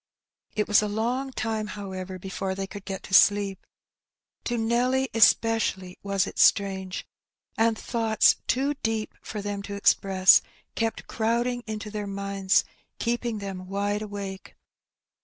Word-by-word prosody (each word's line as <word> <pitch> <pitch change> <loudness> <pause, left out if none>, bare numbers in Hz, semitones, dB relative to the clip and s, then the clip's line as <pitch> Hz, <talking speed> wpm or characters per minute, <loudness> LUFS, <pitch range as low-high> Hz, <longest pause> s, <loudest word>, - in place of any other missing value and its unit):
It 210 - 0
was 210 0 +5
a 210 - -1
long 240 +6 -2
time^ 220 -4 -2
however, 190 -2 -6
before 190 +1 -4
they 195 0 -3
could 200 0 -10
get 195 -1 -5
to - - -10
sleep. 200 -1 +4 0.8
To 240 - -1
Nelly 250 +4 +1
especially 220 -5 +2
was 200 -1 0
it - - -7
strange. 190 -2 +2 0.5
And 225 0 +2
thoughts 225 -2 +2
too 275 +3 +1
deep 225 -1 -2
for 210 -2 -6
them 205 -1 -3
to 200 0 -6
express 190 -1 +5 0.3
kept 225 -1 -2
crowding 235 +2 -1
into 215 -1 -5
their 210 -1 -4
minds, 200 -1 +1 0.3
keeping 235 -1 -1
them 190 -2 -6
wide 205 +2 -1
awake. 200 -2 -7
205 Hz, 140 wpm, -26 LUFS, 195-225 Hz, 0.8 s, was